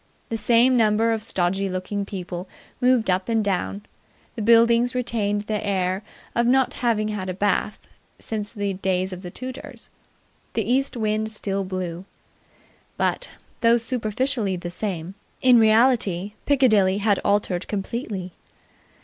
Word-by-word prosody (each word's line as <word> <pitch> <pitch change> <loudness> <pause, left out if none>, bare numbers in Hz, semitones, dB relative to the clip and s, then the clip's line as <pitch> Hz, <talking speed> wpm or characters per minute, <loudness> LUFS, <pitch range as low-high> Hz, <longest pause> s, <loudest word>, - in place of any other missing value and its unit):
The 225 - -2
same 235 +4 +4
number 225 0 +3
of 225 -1 -1
stodgy 195 -2 0
looking 185 +2 -3
people 180 -1 -6 0.3
moved 250 -2 +3
up 185 +3 0
and 225 -2 +1
down. 200 +1 -2 0.5
The 230 - -4
buildings 235 +2 +4
retained 210 -4 -1
their 210 0 -3
air 190 -1 -1 0.3
of 235 0 +2
not 265 +1 +3
having 220 -3 0
had 200 -3 -4
a 185 - -3
bath 205 +1 0 0.4
since 210 -2 -5
the 205 -3 -2
days 185 0 -1
of 180 - -8
the 180 - -7
Tudors. 255 +7 -9 0.6
The 225 - 0
east 260 +1 +1
wind 215 0 0
still 200 -2 -1
blew. 185 -1 -5 0.9
But, - - -1 0.3
though 235 0 +5
superficially 230 -2 -1
the 175 -1 -6
same, 180 -2 -4 0.3
in 250 -2 +6
reality 215 -4 +3
Piccadilly 215 -9 +4
had 205 -1 +2
altered 200 -3 0
completely. 200 -2 -4
210 Hz, 140 wpm, -23 LUFS, 190-230 Hz, 0.9 s, in